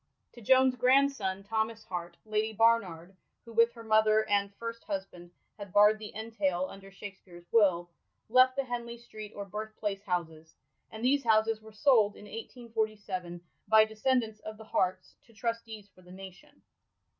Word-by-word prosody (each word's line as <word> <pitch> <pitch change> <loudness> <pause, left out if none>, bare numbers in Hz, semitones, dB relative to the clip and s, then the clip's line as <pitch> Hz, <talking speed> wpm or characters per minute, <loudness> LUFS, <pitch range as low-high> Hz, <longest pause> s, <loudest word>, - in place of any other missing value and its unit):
To 240 - -13
Joan's 260 +3 +4
grandson, 250 -7 +2
Thomas 220 +1 -2
Hart, 175 -2 -6
Lady 215 +1 -1
Barnard— 195 -6 +1 0.3
who, 230 - -12
with 230 +1 +4
her 230 -1 -11
mother 215 0 +3
and 200 -1 +1
first 230 +1 -7
husband, 190 -3 -6 0.3
had 200 -2 -8
barrd 210 +2 +5
the 215 -1 -8
entail 205 -5 -1
under 195 0 -12
Shakspere's 190 -3 -12
will 185 -6 +3 0.2
— - - -50
left 255 +2 +5
the 275 - 0
Henley 240 -2 -5
Street 215 -3 -10
or 200 - -5
Birthplace 210 0 -5
houses; 165 -4 -4 0.3
and 220 +2 -6
these 275 +2 +3
houses 220 -1 +2
were 220 0 -14
sold 215 -2 +3
in - - -13
1847, 215 -6 -5 0.3
by 220 0 +6
descend 240 +4 +1
ants 215 -1 -9
of 215 0 -9
the 220 - -11
Harts, 185 -3 -1
to 230 - -21
trustees 225 -2 -5
for 185 - -20
the 180 0 -16
nation. 190 0 -13
215 Hz, 165 wpm, -30 LUFS, 195-230 Hz, 0.3 s, by